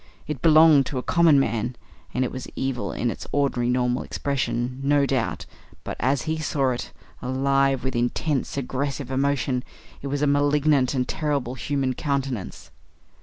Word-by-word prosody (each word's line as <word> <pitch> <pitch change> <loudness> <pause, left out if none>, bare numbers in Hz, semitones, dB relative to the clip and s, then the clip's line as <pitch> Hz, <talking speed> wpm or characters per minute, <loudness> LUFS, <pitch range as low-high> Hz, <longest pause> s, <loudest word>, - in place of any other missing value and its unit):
It 150 -5 -5
belonged 155 -3 +6
to 135 - -4
a 125 - -2
common 165 -5 +4
man, 115 -1 -1 0.4
and 130 0 0
it - - -4
was 130 -1 -6
evil 130 -2 -2
in 120 0 -1
its - - -8
ordinary 135 -4 +1
normal 125 0 +1
expression, 125 -2 -2
no 145 0 +3
doubt, 130 -4 -1 0.4
but - - -5
as 130 +1 +1
he 160 0 -2
saw 140 -4 0
it, 125 - -4 0.3
alive 135 +1 +1
with 130 -1 -2
intense, 130 +4 -1
aggressive 140 0 -3
emotion, 135 -1 0 0.4
it 140 - -5
was 145 +1 -1
a - - +5
malignant 145 -1 +2
and 125 -1 0
terrible 145 -5 -1
human 135 0 -1
countenance. 135 -7 -3
135 Hz, 160 wpm, -24 LUFS, 125-145 Hz, 0.4 s, belonged